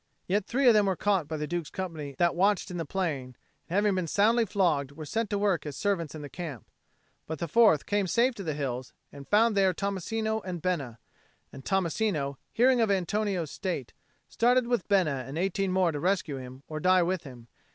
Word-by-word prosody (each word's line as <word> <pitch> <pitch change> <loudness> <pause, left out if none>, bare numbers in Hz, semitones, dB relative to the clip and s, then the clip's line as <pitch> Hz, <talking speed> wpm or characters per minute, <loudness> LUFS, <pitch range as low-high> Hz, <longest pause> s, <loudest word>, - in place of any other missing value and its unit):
Yet 200 +1 0
three 260 +2 +2
of 240 - +8
them 210 -2 +4
were 190 - +1
caught 190 -3 +1
by 155 +1 -4
the 150 - -2
Duke's 170 -1 -3
company 160 -7 -5
that 175 -1 +3
watched 200 +2 +1
in 180 - -4
the 165 - -3
plain, 145 -9 -3 0.3
and, 175 - -3
having 205 0 +3
been 185 -3 -1
soundly 225 +6 +3
flogged, 160 -9 +1
were 155 +1 -8
set 225 +6 -2
to 205 - 0
work 200 -4 +1
as 145 -3 -6
servants 180 -8 -1
in 155 - -7
the - - -6
camp. 155 - -7 0.6
But 160 - -4
the 170 - -3
fourth 210 -5 +4
came 205 -2 0
safe 240 +7 +2
to 205 - -7
the 155 -4 -2
hills, 130 -3 -4 0.2
and 140 -1 -11
found 220 +4 +4
there 190 -2 +3
Tommasino 220 +3 -2
and 180 -2 -5
Bena; 145 -10 -2 0.6
and 135 - -10
Tommasino, 170 -6 0
hearing 250 +1 +4
of 225 - +2
Antonio's 195 -3 0
state, 175 - -4 0.3
started 245 +1 +2
with 240 -5 -1
Bena 160 -10 +2
and 140 +3 -6
eighteen 195 +1 0
more 185 -2 +2
to 145 - -4
rescue 175 -5 0
him 130 +1 -10
or 155 -1 -5
die 185 +2 +4
with 180 0 -1
him. 125 -4 -12
185 Hz, 210 wpm, -28 LUFS, 150-205 Hz, 0.6 s, of